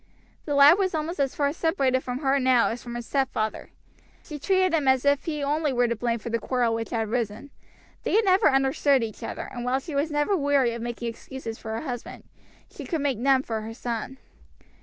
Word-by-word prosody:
The 290 Hz, -, -1 dB
lad 290 Hz, +6 st, +7 dB
was 375 Hz, -3 st, 0 dB
almost 315 Hz, +2 st, -3 dB
as 275 Hz, -2 st, 0 dB
far 285 Hz, -1 st, +1 dB
separated 275 Hz, -6 st, +1 dB
from 250 Hz, +2 st, -4 dB
her 275 Hz, -1 st, +2 dB
now 255 Hz, -2 st, +3 dB
as 235 Hz, -, -5 dB
from 240 Hz, -1 st, -7 dB
his 240 Hz, -1 st, -5 dB
stepfather. 265 Hz, -6 st, -2 dB, 0.5 s
She 300 Hz, -3 st, -8 dB
treated 375 Hz, +2 st, +2 dB
him 300 Hz, -4 st, +1 dB
as 265 Hz, 0 st, +3 dB
if 285 Hz, -1 st, +2 dB
he 300 Hz, -3 st, -3 dB
only 295 Hz, +1 st, 0 dB
were 245 Hz, -1 st, +2 dB
to 235 Hz, -, -1 dB
blame 235 Hz, +1 st, -1 dB
for 235 Hz, +1 st, -7 dB
the 230 Hz, -, 0 dB
quarrel 240 Hz, 0 st, 0 dB
which 225 Hz, 0 st, -3 dB
had 225 Hz, -2 st, -1 dB
arisen. 230 Hz, +3 st, -3 dB, 0.5 s
They -, -, -1 dB
had 445 Hz, 0 st, +4 dB
never 375 Hz, -2 st, +5 dB
understood 270 Hz, -1 st, +2 dB
each 220 Hz, -2 st, -6 dB
other, -, -, -5 dB
and 240 Hz, -2 st, -5 dB
while 250 Hz, +2 st, +1 dB
she 305 Hz, +3 st, -8 dB
was 285 Hz, +3 st, 0 dB
never 295 Hz, +6 st, +1 dB
weary 280 Hz, -6 st, +2 dB
of 235 Hz, -, -6 dB
making 235 Hz, 0 st, -4 dB
excuses 230 Hz, -1 st, -8 dB
for 220 Hz, -, -6 dB
her 225 Hz, -, -3 dB
husband, 245 Hz, -6 st, -6 dB, 0.4 s
she -, -, -10 dB
could 325 Hz, -4 st, -2 dB
make 275 Hz, -6 st, 0 dB
none 265 Hz, +1 st, +3 dB
for 225 Hz, -4 st, -3 dB
her 225 Hz, +1 st, -7 dB
son. 240 Hz, +2 st, -4 dB
265 Hz, 225 wpm, -25 LUFS, 235-290 Hz, 0.5 s, lad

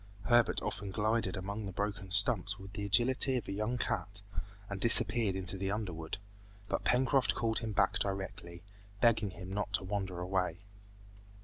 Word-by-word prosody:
Herbert 120 Hz, +2 st, +2 dB
often 100 Hz, -1 st, -4 dB
glided 105 Hz, -1 st, -1 dB
among 100 Hz, +3 st, -5 dB
the -, -, -6 dB
broken 100 Hz, 0 st, -4 dB
stumps 100 Hz, 0 st, +4 dB
with 95 Hz, 0 st, -12 dB
the 100 Hz, 0 st, -4 dB
agility 130 Hz, +6 st, +4 dB
of 115 Hz, -, -5 dB
a -, -, -4 dB
young 105 Hz, +5 st, -2 dB
cat, 100 Hz, -2 st, -3 dB, 0.4 s
and 100 Hz, -1 st, -6 dB
disappeared 115 Hz, -3 st, +5 dB
in 95 Hz, -1 st, -4 dB
the 95 Hz, +2 st, +3 dB
underwood. 90 Hz, -7 st, -4 dB, 0.5 s
But -, -, -2 dB
Pencroft 130 Hz, +1 st, +2 dB
called 115 Hz, -1 st, 0 dB
him 115 Hz, -1 st, -4 dB
back 100 Hz, -1 st, +1 dB
directly, 95 Hz, -3 st, -5 dB, 0.4 s
begging 115 Hz, -3 st, +3 dB
him 95 Hz, 0 st, -9 dB
not 105 Hz, 0 st, -3 dB
to 100 Hz, -, +1 dB
wander 95 Hz, -2 st, -4 dB
away. 90 Hz, 0 st, -2 dB
100 Hz, 165 wpm, -32 LUFS, 95-110 Hz, 0.5 s, disappeared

